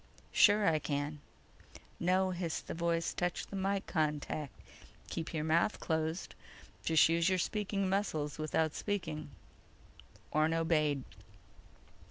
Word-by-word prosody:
"Sure. 205 -1 +5
I 160 -1 +3
can—" 145 +1 -2 0.8
"No!" 185 +2 +2
hissed 175 -2 -3
the - - -5
voice. 170 0 0
"Touch 175 -1 -1
the - - -8
mike 195 0 0
contact. 150 -3 -2 0.5
Keep 165 - -4
your 155 -2 -2
mouth 165 +6 +2
closed. 160 +1 -2 0.5
Just 160 -1 +5
use 165 +2 +2
your 185 - +2
speaking 200 +1 -1
muscles 170 -7 -1
without 155 0 +1
speaking." 160 -8 -3 1.0
Orne 155 +2 +2
obeyed. 155 -4 +1
165 Hz, 120 wpm, -33 LUFS, 155-185 Hz, 1.0 s, Sure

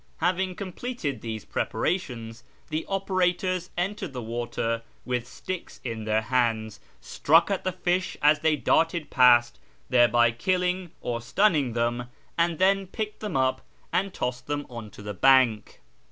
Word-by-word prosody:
Having 185 +2 0
completed 185 - -4
these 110 -2 -5
preparations, 120 -11 -2 0.3
the 155 +1 -3
operators 185 -2 0
entered 190 -3 -2
the 125 - -4
water 115 0 -2 0.2
with 125 -1 -2
sticks 185 +5 -7
in 115 -3 -4
their 110 0 +1
hands, 115 -3 0 0.2
struck 165 +6 +3
at 195 - -1
the 185 - 0
fish 180 0 -1
as 150 +1 +4
they 160 -1 +2
darted 165 +1 +1
past, 120 -2 +5 0.3
thereby 120 -1 +5
killing 180 +7 0
or 120 -1 -3
stunning 145 - +2
them, 120 +1 -1 0.3
and 170 -1 +1
then 195 +2 +3
picked 210 +2 -5
them 210 -9 -3
up 130 0 +1 0.3
and 195 +1 +1
tossed 125 -5 -4
them 145 0 -2
on 115 -3 -7
to 100 - -13
the 105 0 -5
bank. 125 -1 +3
145 Hz, 145 wpm, -26 LUFS, 120-185 Hz, 0.3 s, past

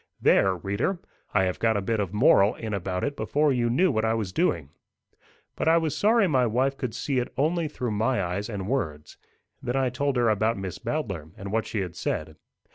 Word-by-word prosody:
There, 95 -1 +4
reader! 100 - -1 0.3
I 95 - +3
have 90 -1 -1
got 110 -2 +2
a - - +1
bit 110 +3 -1
of 100 -3 -1
a - - -15
moral 105 0 +5
in 110 -2 -5
about 90 -1 -2
it 145 0 -1
before 145 0 +1
you 120 -2 +1
knew 175 +10 +3
what 110 -3 0
I 110 0 +2
was 105 -5 -3
doing. 85 - 0 0.8
But - - -2
I 165 +1 +6
was 160 -3 0
sorry 220 0 +3
my 130 -6 +2
wife 130 +5 +1
could 125 -4 -4
see 135 -3 -1
it 125 - -3
only 160 +4 +1
through 125 -5 -4
my 115 +4 +1
eyes 95 +5 -3
and 100 -3 -4
words. 80 - -3 0.4
Then 120 - -3
I 130 -2 +1
told 140 +2 -1
her 120 -1 +3
about 110 +1 +1
Miss 95 -2 -5
Bowdler, 110 - -3
and 100 -1 -7
what 110 0 0
she 105 - -2
had 90 -3 -5
said. - - -3
115 Hz, 220 wpm, -26 LUFS, 100-135 Hz, 0.8 s, I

